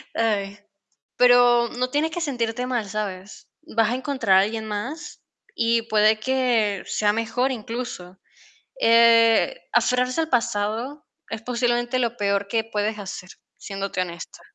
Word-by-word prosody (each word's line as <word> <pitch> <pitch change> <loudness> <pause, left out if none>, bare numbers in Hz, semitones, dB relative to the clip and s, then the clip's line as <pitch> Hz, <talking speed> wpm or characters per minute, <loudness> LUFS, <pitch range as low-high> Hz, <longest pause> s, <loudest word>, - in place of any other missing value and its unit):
Ay, 205 -3 -1 0.6
pero 245 -1 +5
no 250 0 0
tienes 300 +4 0
que 345 - -5
sentirte 245 -5 -2
mal, 240 -5 -2
¿sabes?, 200 -1 -6 0.3
vas 225 -1 +3
a - - 0
encontrar 255 -7 +2
a - - +6
alguien 220 +3 -2
más 240 +11 -6 0.3
y 230 0 +1
puede 215 -1 +3
que 230 -5 0
sea 205 -1 +1
mejor 230 +4 -1
incluso, 225 -6 -6 0.6
eh, 230 - +5
aferrarse 250 +3 +1
al 320 0 -2
pasado 235 +4 -1 0.2
es 225 -1 -5
posiblemente 240 +1 0
lo 240 -1 -1
peor 200 -2 -1
que 225 +1 0
puedes 215 -1 -2
hacer, 195 -2 -7 0.3
siéndote 195 -2 -4
honesta, 170 -2 -6
230 Hz, 135 wpm, -23 LUFS, 210-250 Hz, 0.6 s, a